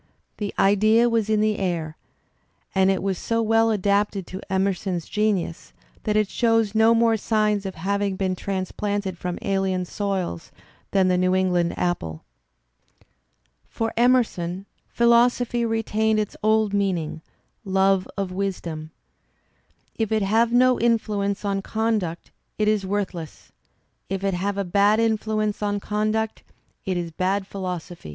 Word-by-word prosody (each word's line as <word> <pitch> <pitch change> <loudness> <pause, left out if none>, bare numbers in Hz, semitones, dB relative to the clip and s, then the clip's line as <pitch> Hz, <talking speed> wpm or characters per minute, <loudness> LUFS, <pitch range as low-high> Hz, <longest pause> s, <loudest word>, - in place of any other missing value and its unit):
The 205 -2 -3
idea 215 +4 +4
was 225 -2 0
in 215 -1 +2
th 215 0 +2
e - - -5
air 165 -4 -2 0.8
and 190 0 +3
it 190 -1 0
was 195 -2 -1
so 230 0 0
weU 225 +1 +3
adapted 200 -1 +1
to 190 +3 -7
Emerson's 190 -2 -1
genius 210 -6 -1 0.3
that 210 - 0
it 215 -1 +2
shows 225 -2 +1
no 225 +1 +5
more 230 -1 +3
signs 210 -2 0
of 190 - -6
having 200 +3 -1
been 185 -1 -1
transplanted 195 +1 -3
from 180 0 -4
alien 190 -2 0
soils 190 - -3 0.4
than 190 -2 +3
the 180 -1 +2
New 185 0 +2
England 180 -2 +1
apple. 85 - -2 1.5
For 225 -1 -3
Emerson 220 -7 +1 0.2
philosophy 235 0 +3
retained 220 -1 +1
its 210 - -3
old 215 -1 +2
meaning, 180 -6 -1 0.4
love 195 -1 +2
of 195 -2 -2
wisdom. 175 -5 -4 1.1
If 220 -2 -1
it 215 -2 +2
have 225 +4 +2
no 255 +1 +4
influence 210 -3 0
on 195 -1 0
conduct 215 -6 -2 0.3
it 215 - +1
is 210 -3 +1
worthless; 190 -5 -4 0.6
if 195 0 -3
it 195 -1 +1
have 195 +3 -2
a 200 - 0
bad 200 +4 +3
influence 215 -2 0
on 205 -1 0
conduct 215 +2 -1 0.5
it 185 -1 0
is 170 -1 -3
bad 190 +4 -1
philosophy. 180 - -6
200 Hz, 140 wpm, -24 LUFS, 185-220 Hz, 1.5 s, no